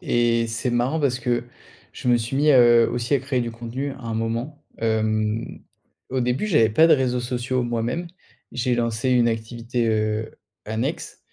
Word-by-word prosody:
et 120 Hz, -7 st, +1 dB
c'est 115 Hz, +2 st, -2 dB
marrant 125 Hz, +6 st, 0 dB
parce 130 Hz, -4 st, +1 dB
que 120 Hz, -1 st, 0 dB, 0.5 s
je -, -, -8 dB
me 120 Hz, -1 st, +5 dB
suis 120 Hz, +3 st, -3 dB
mis, 150 Hz, +2 st, +4 dB
heu, 120 Hz, -2 st, +6 dB
aussi 120 Hz, +3 st, -1 dB
à -, -, +3 dB
créer 130 Hz, -1 st, -2 dB
du 120 Hz, -1 st, -2 dB
contenu 120 Hz, +5 st, -5 dB
à 135 Hz, -, -12 dB
un 115 Hz, -1 st, -3 dB
moment. 115 Hz, +7 st, -3 dB, 0.2 s
Hem, 110 Hz, 0 st, -1 dB, 0.5 s
au 130 Hz, 0 st, -1 dB
début, 125 Hz, +10 st, 0 dB
j'avais 150 Hz, -, +4 dB
pas 160 Hz, +10 st, +5 dB
de -, -, +6 dB
réseaux 125 Hz, -2 st, 0 dB
sociaux 125 Hz, +1 st, -2 dB
moi-même, 120 Hz, +8 st, -2 dB, 0.5 s
j'ai 125 Hz, 0 st, 0 dB
lancé 120 Hz, +2 st, -1 dB
une 125 Hz, -2 st, +4 dB
activité, 115 Hz, +1 st, -2 dB
heu, 110 Hz, 0 st, -1 dB, 0.3 s
annexe, 110 Hz, +2 st, -4 dB
120 Hz, 175 wpm, -23 LUFS, 115-130 Hz, 0.5 s, heu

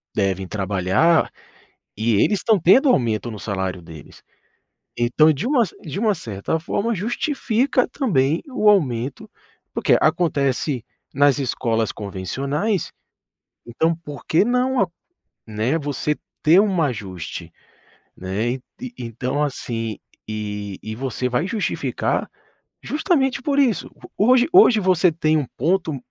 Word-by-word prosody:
devem 95 Hz, -1 st, 0 dB
trabalhar 100 Hz, -, +1 dB, 0.7 s
e 110 Hz, +2 st, +1 dB
eles 205 Hz, -, +3 dB
estão 220 Hz, -3 st, +3 dB
tendo 225 Hz, -, +5 dB
aumento 120 Hz, -, +1 dB
no 110 Hz, -, -7 dB
salário 95 Hz, -3 st, -3 dB
deles. 80 Hz, -2 st, -13 dB, 0.8 s
Então 125 Hz, +7 st, +4 dB
de 155 Hz, -, -4 dB
uma 255 Hz, -3 st, +3 dB
cer -, -, -14 dB
de 160 Hz, +4 st, -6 dB
uma 215 Hz, -1 st, +2 dB
certa 110 Hz, -, -3 dB
forma, 210 Hz, +7 st, -1 dB
justifica 240 Hz, -, 0 dB
também 160 Hz, -, +1 dB
o 215 Hz, -5 st, +2 dB
aumento 130 Hz, -, 0 dB, 0.4 s
porque -, -, +3 dB
acontece 145 Hz, -5 st, +1 dB, 0.3 s
nas 145 Hz, 0 st, +4 dB
escolas 115 Hz, -4 st, -1 dB
convencionais, 135 Hz, -, -3 dB, 0.7 s
então 160 Hz, +8 st, 0 dB
por 150 Hz, -4 st, -10 dB
que 160 Hz, -, +3 dB
não 250 Hz, +1 st, +1 dB
a 195 Hz, -, +2 dB, 0.6 s
né, 110 Hz, +8 st, -1 dB
você 145 Hz, 0 st, -2 dB, 0.3 s
ter 165 Hz, +4 st, +6 dB
um 195 Hz, -4 st, +1 dB
ajuste, 100 Hz, -, -5 dB, 0.6 s
né. 95 Hz, +6 st, -2 dB
Ent 130 Hz, 0 st, -6 dB, 0.4 s
então 125 Hz, +5 st, -3 dB
assim, 115 Hz, -6 st, -3 dB, 0.3 s
e 105 Hz, -2 st, -5 dB
e 110 Hz, -, -5 dB
você 125 Hz, 0 st, -2 dB
vai 125 Hz, +7 st, 0 dB
justificar 215 Hz, +1 st, -1 dB, 0.6 s
justamente 285 Hz, -5 st, 0 dB
por 280 Hz, +2 st, -1 dB
isso. 250 Hz, -8 st, +1 dB, 0.3 s
Hoje 245 Hz, +4 st, +4 dB
hoje 360 Hz, -, +7 dB
você 185 Hz, -2 st, +3 dB
tem 155 Hz, -1 st, +1 dB
um 150 Hz, -, -1 dB
ponto 160 Hz, +1 st, 0 dB
145 Hz, 125 wpm, -21 LUFS, -, 0.8 s, hoje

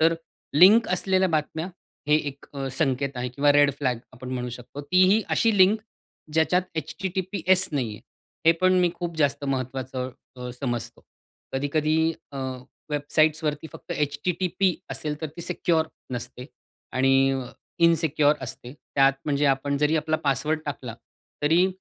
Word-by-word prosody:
तर 165 Hz, +1 st, +5 dB, 0.4 s
लिंक 200 Hz, +9 st, +7 dB
असलेल्या 185 Hz, +1 st, +2 dB
बातम्या, 160 Hz, +1 st, -1 dB, 0.4 s
हे 150 Hz, -, +5 dB
एक 140 Hz, 0 st, -11 dB, 0.3 s
संकेत 140 Hz, -2 st, +1 dB
आहे 125 Hz, 0 st, -2 dB
किंवा 140 Hz, +4 st, +2 dB
रेड 145 Hz, 0 st, +5 dB
फ्लॅग्स 125 Hz, -4 st, -1 dB
आपण 130 Hz, 0 st, -9 dB
म्हणू 125 Hz, 0 st, -3 dB
शकतो. 125 Hz, +4 st, -8 dB
ती 180 Hz, +6 st, +3 dB
ही 220 Hz, -, +4 dB
अशी 225 Hz, -3 st, +2 dB
लिंक 200 Hz, +4 st, +5 dB, 0.5 s
ज्याच्यात 160 Hz, +3 st, +3 dB, 0.2 s
H-T-T-P-S 185 Hz, +3 st, 0 dB
नाही 130 Hz, -6 st, 0 dB
आहे, 105 Hz, -, -12 dB, 0.5 s
हे 165 Hz, -, +8 dB
पण 185 Hz, 0 st, +4 dB
मी 175 Hz, -1 st, +3 dB
खूप 170 Hz, -1 st, -5 dB
जास्त 145 Hz, -2 st, +1 dB
महत्त्वाचं 130 Hz, -1 st, -3 dB, 0.3 s
अ, 125 Hz, 0 st, -6 dB
समजतो. 120 Hz, -4 st, -3 dB, 0.5 s
कधी-कधी 150 Hz, +3 st, 0 dB, 0.4 s
अ, 135 Hz, -, -6 dB, 0.5 s
वेबसाइट्सवरती 150 Hz, +1 st, +1 dB
फक्त -, -, -8 dB
H-T-T-P 180 Hz, +5 st, 0 dB, 0.2 s
असेल, 150 Hz, +3 st, -4 dB
तर 160 Hz, -, -2 dB
ती -, -, -6 dB
सिक्युअर 165 Hz, -2 st, +1 dB, 0.3 s
नसते 125 Hz, +1 st, -6 dB, 0.5 s
आणि 135 Hz, +1 st, +4 dB
अ, 130 Hz, -2 st, -3 dB, 0.4 s
इनसिक्युअर 155 Hz, -2 st, +3 dB
असते 125 Hz, 0 st, -7 dB
त्यात, 140 Hz, -2 st, +2 dB
म्हणजे 145 Hz, -1 st, +1 dB
आपण 140 Hz, +1 st, -2 dB
जरी 155 Hz, +2 st, +2 dB
आपला 155 Hz, +1 st, 0 dB
पासवर्ड 150 Hz, +4 st, 0 dB
टाकला, 130 Hz, -5 st, -5 dB, 0.5 s
तरी 165 Hz, +5 st, +4 dB
150 Hz, 145 wpm, -25 LUFS, 135-165 Hz, 0.5 s, हे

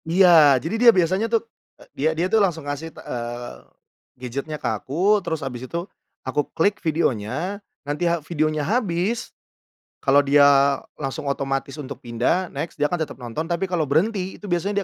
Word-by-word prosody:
Iya, 165 Hz, -6 st, +7 dB
jadi 165 Hz, -, -3 dB
dia 240 Hz, -1 st, +9 dB
biasanya 185 Hz, +6 st, +2 dB
tuh, 230 Hz, 0 st, +1 dB, 0.3 s
e -, -, -17 dB
dia 155 Hz, +3 st, 0 dB
dia 170 Hz, -, +1 dB
tuh 215 Hz, +3 st, +3 dB
langsung 165 Hz, -6 st, 0 dB
ngasih, 145 Hz, +3 st, -4 dB
eee, 120 Hz, -, -6 dB, 0.6 s
gadget-nya 135 Hz, +5 st, -5 dB
ke -, -, -11 dB
aku, 160 Hz, -, +1 dB
terus 160 Hz, -4 st, -3 dB
habis 125 Hz, -2 st, -5 dB
itu, 170 Hz, +1 st, -3 dB, 0.4 s
aku 130 Hz, +3 st, 0 dB, 0.2 s
klik 200 Hz, +5 st, +2 dB
videonya, 160 Hz, -, -1 dB, 0.2 s
nanti 150 Hz, +4 st, 0 dB
ha 170 Hz, -, +2 dB
videonya 155 Hz, -2 st, 0 dB
habis, 210 Hz, -, -1 dB, 0.8 s
kalau 140 Hz, 0 st, +5 dB
dia 145 Hz, 0 st, +5 dB, 0.6 s
langsung 140 Hz, +2 st, -4 dB
otomatis 135 Hz, 0 st, -3 dB
untuk 140 Hz, -2 st, -7 dB
pindah 120 Hz, +10 st, 0 dB
next 150 Hz, +4 st, -5 dB
dia 145 Hz, -, +3 dB
akan 175 Hz, +2 st, -2 dB
tetap 155 Hz, -, -6 dB
nonton 125 Hz, +6 st, -5 dB
tapi 175 Hz, +2 st, 0 dB
kalau 175 Hz, -3 st, -1 dB
berhenti, 190 Hz, +5 st, 0 dB
itu -, -, -18 dB
biasanya 195 Hz, +3 st, 0 dB
160 Hz, 165 wpm, -23 LUFS, 140-185 Hz, 0.8 s, dia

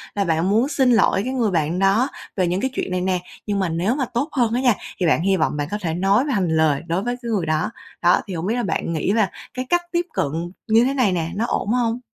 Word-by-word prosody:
là 200 Hz, -, +1 dB
bạn 165 Hz, 0 st, +1 dB
muốn 225 Hz, +6 st, +3 dB
xin 265 Hz, -5 st, +3 dB
ỗi 195 Hz, -, +3 dB
cái 255 Hz, +3 st, -3 dB
người 235 Hz, -6 st, +1 dB
bạn 165 Hz, 0 st, 0 dB
đó 195 Hz, +6 st, +3 dB, 0.3 s
về 185 Hz, -2 st, +2 dB
những 180 Hz, +3 st, -1 dB
cái 265 Hz, -, 0 dB
chuyện 195 Hz, -, -3 dB
này 180 Hz, 0 st, 0 dB
nè, 185 Hz, 0 st, 0 dB, 0.3 s
nhưng 205 Hz, -1 st, 0 dB
mà 190 Hz, -3 st, 0 dB
nếu 175 Hz, +9 st, 0 dB
mà 275 Hz, -2 st, 0 dB
tốt 275 Hz, +7 st, 0 dB
hơn 240 Hz, -5 st, +1 dB
á 245 Hz, -, +1 dB
nha, 250 Hz, -3 st, +4 dB, 0.3 s
thì 180 Hz, -, +1 dB
bạn 160 Hz, -, +3 dB
hy 190 Hz, +2 st, +2 dB
vọng 155 Hz, -3 st, 0 dB
bạn 145 Hz, -1 st, -2 dB
có 210 Hz, -, -1 dB
thể 165 Hz, -4 st, -2 dB
nói 195 Hz, -, +2 dB
mà 290 Hz, -, -1 dB
hành 190 Hz, -6 st, +1 dB
lời 155 Hz, -3 st, +2 dB
đối 175 Hz, +4 st, -1 dB
với 245 Hz, +1 st, -1 dB
cái 235 Hz, -, -5 dB
người 195 Hz, -6 st, 0 dB
đó. 155 Hz, +5 st, 0 dB, 0.3 s
Đó, 175 Hz, 0 st, +4 dB
thì 195 Hz, -, -5 dB
hổng 165 Hz, 0 st, -3 dB
biết 220 Hz, +4 st, 0 dB
là 245 Hz, -, -1 dB
bạn 170 Hz, -2 st, -2 dB
nghĩ 160 Hz, +4 st, 0 dB
là 215 Hz, -4 st, +2 dB, 0.2 s
cái 255 Hz, 0 st, -4 dB
cách 350 Hz, 0 st, +3 dB
tiếp 345 Hz, 0 st, 0 dB
cận 165 Hz, +5 st, -2 dB, 0.2 s
như 225 Hz, +2 st, +5 dB
thế 270 Hz, -, 0 dB
này 250 Hz, -8 st, +2 dB
nè, 165 Hz, -2 st, -1 dB
nó 220 Hz, +3 st, 0 dB
ổn -, -, -1 dB
hông? 240 Hz, -1 st, 0 dB
195 Hz, 285 wpm, -21 LUFS, 175-240 Hz, 0.3 s, như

